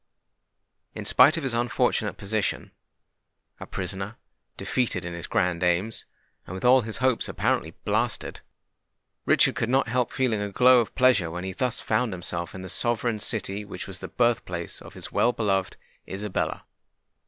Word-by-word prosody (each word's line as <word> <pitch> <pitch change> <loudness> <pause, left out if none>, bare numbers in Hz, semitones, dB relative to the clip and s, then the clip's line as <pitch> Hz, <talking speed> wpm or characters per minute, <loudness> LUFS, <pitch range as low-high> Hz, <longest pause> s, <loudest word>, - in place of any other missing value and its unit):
In - - -6
spite 155 +4 +6
of 165 - -3
his 135 -3 0
unfortunate 120 +1 0
position,—a 105 +1 -6
prisoner, 95 +3 -5 0.4
defeated 115 -9 -1
in 85 - -5
his 85 0 -6
grand 90 -1 0
aims, 90 +5 0 0.4
and 95 - -6
with 95 - -5
all 130 +1 +7
his 110 -1 -5
hopes 130 -2 +1
apparently - - -1
blasted,—Richard - - -2
could 115 - -2
not 130 +1 +3
help 125 0 0
feeling 120 -6 0
a 105 - -2
glow 125 +3 +6
of 115 - -6
pleasure 125 -10 +4
when 90 +2 -5
he 95 - -3
thus 125 +5 -1
found 125 -5 0
himself 85 -1 -4
in 95 - -7
the - - -6
sovereign 115 +3 0
city 105 -2 -2
which 105 - -7
was - - -7
the - - -6
birth 120 -1 +1
place 85 -1 -5
of - - -12
his - - -5
well 120 - +3
beloved 100 -5 0 0.3
Isabella. 100 +1 -3
105 Hz, 160 wpm, -26 LUFS, 95-125 Hz, 0.4 s, all